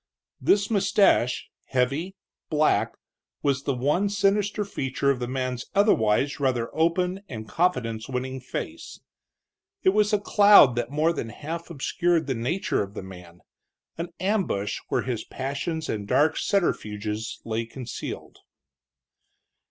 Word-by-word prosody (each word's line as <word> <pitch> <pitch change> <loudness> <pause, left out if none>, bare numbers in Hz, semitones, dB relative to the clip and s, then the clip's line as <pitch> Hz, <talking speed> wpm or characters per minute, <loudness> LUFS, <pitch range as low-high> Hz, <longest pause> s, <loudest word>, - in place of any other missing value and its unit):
This 200 +2 +3
mustache, 195 - +3 0.2
heavy, 140 +9 0 0.3
black, 155 -1 +2 0.5
was 140 -1 0
the 140 - 0
one 150 +11 +1
sinister 205 +1 +1
feature 140 -6 0
of 130 - -2
the 120 - -3
man's 130 -1 -3
otherwise 145 - +3
rather 125 -4 0
open 180 +4 +1
and 110 -3 -7
confidence 125 -11 0
winning 130 +1 -3
face. 125 - -6 0.8
It - - +6
was 210 +2 +3
a 210 - +4
cloud 205 - +7
that 120 0 -2
more 155 +4 +1
than 115 -7 -4
half 165 +9 -6
obscured 170 +2 0
the 135 - -1
nature 130 +11 -1
of 100 0 -6
the - - -5
man, 90 -2 -12 0.5
an 170 +1 -4
ambush 185 - 0
where - - 0
his 120 -3 -3
passions 140 +4 -4
and 105 -2 -3
dark 155 +7 +3
subterfuges 110 - -1
lay 115 0 -2
concealed. 125 0 -7
140 Hz, 130 wpm, -25 LUFS, 120-180 Hz, 0.8 s, cloud